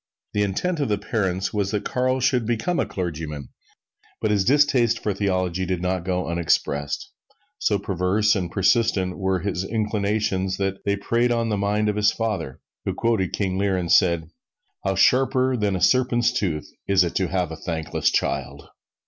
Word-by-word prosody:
The 105 - +1
intent 150 - -1
of 140 - 0
the 105 - +1
parents 95 -3 -2
was 100 -2 0
that 105 0 -2
Carl 130 +1 0
should 125 -3 +1
become 145 +10 0
a - - 0
clergyman, 80 -5 -5 0.7
but 110 - 0
his 100 -2 +2
distaste 125 -2 +3
for 105 -2 -2
theology 95 -2 -1
did 90 -1 -1
not 90 0 -1
go 90 -1 -1
unexpressed. 80 -4 -1 0.5
So 105 - +2
perverse 100 +3 +1
and 90 -3 -2
persistent 100 -2 +1
were 95 -2 0
his 95 -1 -2
inclinations 105 -2 -1
that 95 0 -2
they 100 - +2
preyed 115 +4 +1
on 115 -1 0
the 105 - +1
mind 105 +2 0
of 105 0 0
his 105 0 +4
father, 105 - -3 0.2
who - - -2
quoted 110 -6 0
King 95 -2 -1
Lear 100 -1 +1
and 85 -2 -2
said, 85 -2 +3 0.5
"How 95 0 0
sharper 130 +5 +3
than 105 -4 0
a 90 - -3
serpent's 120 -2 +3
tooth 85 -10 -2 0.2
it - - -1
is 90 -3 +4
to 95 - 0
have 90 -2 -1
a - - -5
thankless 80 -2 -1
child!" - - -2
100 Hz, 175 wpm, -23 LUFS, 90-110 Hz, 0.7 s, his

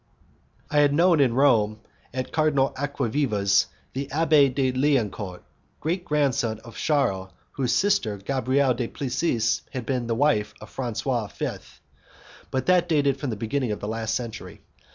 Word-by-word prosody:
I 150 - +3
had 145 -1 +4
known 170 0 +4
in 130 -4 +3
Rome, 110 -6 +3 0.3
at 130 0 -4
Cardinal 150 -4 +2
Acquaviva's, 120 -7 +1 0.3
the 135 +1 -3
Abbé 145 -2 +4
de 130 0 +1
Liancourt, 115 -9 -1 0.4
great 175 +3 -2
grandson 135 -7 +1
of 115 - -13
Charles, 100 - 0 0.2
whose 130 -3 -1
sister, 190 - +1
Gabrielle 130 +5 +1
du 120 0 -3
Plessis, 125 -3 0
had 125 -3 -5
been 125 -3 -1
the 115 - 0
wife 125 -5 +1
of - - -12
Francois 120 -2 -2
V., - - -3 1.0
but 130 -1 -2
that 180 -1 +3
dated 140 -4 +2
from 140 - -3
the 110 - -2
beginning 115 +3 -2
of 105 - -3
the 105 - -5
last 115 0 -2
century. 115 -2 -6
130 Hz, 155 wpm, -25 LUFS, 115-145 Hz, 1.0 s, had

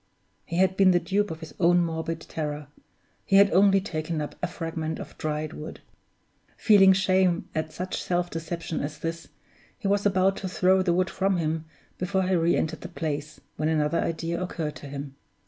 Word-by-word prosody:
he 170 - -3
had 190 0 +3
been 195 -1 +5
the 180 -1 +4
dupe 205 +3 0
of 160 0 -7
his 160 - -9
own 175 0 +5
morbid 165 -1 -2
terror 150 -1 -4 0.6
he 195 - +1
had 200 0 +7
only 195 +2 +5
taken 160 -3 -3
up 150 - -4
a - - 0
fragment 165 -2 -4
of - - -9
dried 155 0 -2
wood! 155 - -8 0.8
Feeling 195 -3 +6
shame 185 -2 +2
at 155 0 -2
such 180 +4 -4
self 175 0 0
deception 165 0 -4
as 150 +2 -4
this, 165 +1 -5 0.5
he 225 - -3
was 200 0 +2
about 195 -1 +2
to 190 - -4
throw 185 +1 +3
the 185 -2 +1
wood 180 +1 +1
from 195 -1 +1
him 160 -1 -1 0.3
before 190 +1 0
he 185 +1 0
re 170 -1 +3
entered 160 - -2
the 180 - -7
place, 155 -3 -4 0.2
when 155 +1 0
another 155 +1 +1
idea 165 +1 -2
occurred 165 -4 -3
to 145 - -10
him. 140 0 -6
170 Hz, 190 wpm, -26 LUFS, 155-185 Hz, 0.8 s, had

